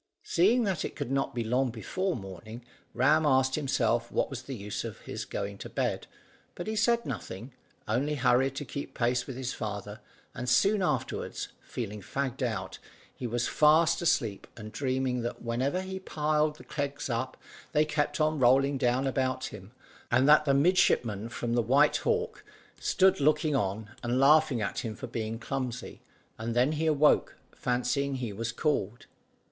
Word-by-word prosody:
Seeing 220 Hz, +8 st, +3 dB
that 195 Hz, -5 st, -1 dB
it -, -, -5 dB
could 125 Hz, -, -4 dB
not 135 Hz, -2 st, 0 dB
be 120 Hz, -, -1 dB
long 125 Hz, +3 st, +1 dB
before 180 Hz, -, -2 dB
morning, 110 Hz, +4 st, -9 dB, 0.3 s
Ram 150 Hz, +6 st, +4 dB
asked 130 Hz, -2 st, +3 dB
himself 120 Hz, -5 st, 0 dB
what -, -, 0 dB
was 130 Hz, -2 st, -5 dB
the 135 Hz, +1 st, -6 dB
use 105 Hz, -2 st, -4 dB
of -, -, -7 dB
his -, -, -6 dB
going 100 Hz, 0 st, -5 dB
to -, -, -7 dB
bed; -, -, -2 dB, 0.5 s
but 175 Hz, -, -5 dB
he 220 Hz, -, -2 dB
said 235 Hz, +2 st, +2 dB
nothing, 120 Hz, 0 st, -6 dB, 0.3 s
only 135 Hz, +7 st, 0 dB
hurried 135 Hz, 0 st, +2 dB
to 145 Hz, -, -4 dB
keep 140 Hz, +3 st, -6 dB
pace 125 Hz, +1 st, 0 dB
with 135 Hz, -, -6 dB
his 130 Hz, -1 st, -3 dB
father; 105 Hz, 0 st, -5 dB, 0.3 s
and 125 Hz, +1 st, -4 dB
soon 200 Hz, -, +4 dB
after, 180 Hz, -, -1 dB, 0.3 s
feeling 105 Hz, -3 st, -5 dB
fagged 135 Hz, +5 st, -3 dB
out, 115 Hz, -6 st, -3 dB, 0.4 s
he 125 Hz, -, -4 dB
was 120 Hz, +1 st, -1 dB
fast 155 Hz, +3 st, +4 dB
asleep, 115 Hz, -11 st, 0 dB
and 110 Hz, -1 st, -8 dB
dreaming 130 Hz, -1 st, -1 dB
that 120 Hz, +1 st, -5 dB
whenever 130 Hz, +9 st, 0 dB
he 190 Hz, 0 st, -5 dB
piled 150 Hz, -3 st, 0 dB
the -, -, -13 dB
kegs 145 Hz, -1 st, -3 dB
up 130 Hz, +1 st, -2 dB, 0.3 s
they 150 Hz, -1 st, +3 dB
kept 150 Hz, 0 st, -1 dB
on 155 Hz, -1 st, +2 dB
rolling 135 Hz, +2 st, +4 dB
down 125 Hz, +2 st, +2 dB
about 130 Hz, -1 st, -1 dB
him, -, -, -11 dB, 0.4 s
and 130 Hz, +3 st, +3 dB
that 150 Hz, 0 st, +7 dB
the 140 Hz, -, +3 dB
midshipman 125 Hz, -, +2 dB
from 115 Hz, +1 st, -3 dB
the 120 Hz, -, +3 dB
White 140 Hz, +6 st, +4 dB
Hawk 465 Hz, 0 st, -1 dB, 0.4 s
stood 190 Hz, -1 st, +3 dB
looking 150 Hz, +1 st, +2 dB
on, 105 Hz, -2 st, -2 dB
and 120 Hz, +1 st, 0 dB
laughing 145 Hz, -4 st, +5 dB
at 100 Hz, -, -2 dB
him 110 Hz, -2 st, -4 dB
for -, -, -7 dB
being 110 Hz, 0 st, -4 dB
clumsy, 125 Hz, 0 st, -5 dB, 0.4 s
and 115 Hz, +1 st, -3 dB
then 125 Hz, +4 st, +3 dB
he 155 Hz, +1 st, -1 dB
awoke 150 Hz, -1 st, +3 dB, 0.2 s
fancying 125 Hz, +3 st, 0 dB
he 120 Hz, -5 st, -4 dB
was 115 Hz, +3 st, -3 dB
called. 120 Hz, -5 st, -1 dB
130 Hz, 175 wpm, -29 LUFS, 115-150 Hz, 0.5 s, that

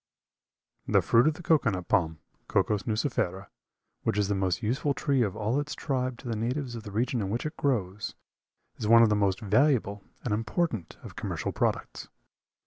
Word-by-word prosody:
The -, -, +3 dB
fruit 120 Hz, +4 st, +4 dB
of 155 Hz, -, +2 dB
the 175 Hz, -, -10 dB
cocoa 155 Hz, -7 st, +3 dB
nut 95 Hz, -3 st, -4 dB
palm, 80 Hz, -3 st, +1 dB, 0.3 s
(Cocos 105 Hz, -2 st, +1 dB
nucifera), 105 Hz, -5 st, -1 dB, 0.5 s
which -, -, -1 dB
is 105 Hz, -1 st, +1 dB
the -, -, +2 dB
most 95 Hz, +2 st, 0 dB
useful 135 Hz, +5 st, 0 dB
tree 140 Hz, -3 st, +1 dB
of 105 Hz, -4 st, 0 dB
all 110 Hz, +5 st, 0 dB
its 145 Hz, +1 st, -4 dB
tribe 130 Hz, -4 st, -2 dB
to 130 Hz, -, -9 dB
the 115 Hz, -, -1 dB
natives 125 Hz, +4 st, -2 dB
of 115 Hz, -, -5 dB
the 105 Hz, -, -9 dB
regions 120 Hz, +3 st, 0 dB
in 95 Hz, -, -2 dB
which 115 Hz, +7 st, -2 dB
it 155 Hz, +1 st, -4 dB
grows, 105 Hz, -7 st, -1 dB, 0.6 s
is 105 Hz, -, -3 dB
one 115 Hz, +1 st, +8 dB
of 115 Hz, -, +5 dB
the 105 Hz, -, +3 dB
most 100 Hz, 0 st, +1 dB
valuable 110 Hz, -2 st, +2 dB, 0.2 s
and 115 Hz, -, -1 dB
important 110 Hz, -, -2 dB
of -, -, -10 dB
commercial -, -, -3 dB
products. -, -, -2 dB
115 Hz, 190 wpm, -28 LUFS, 100-130 Hz, 0.6 s, one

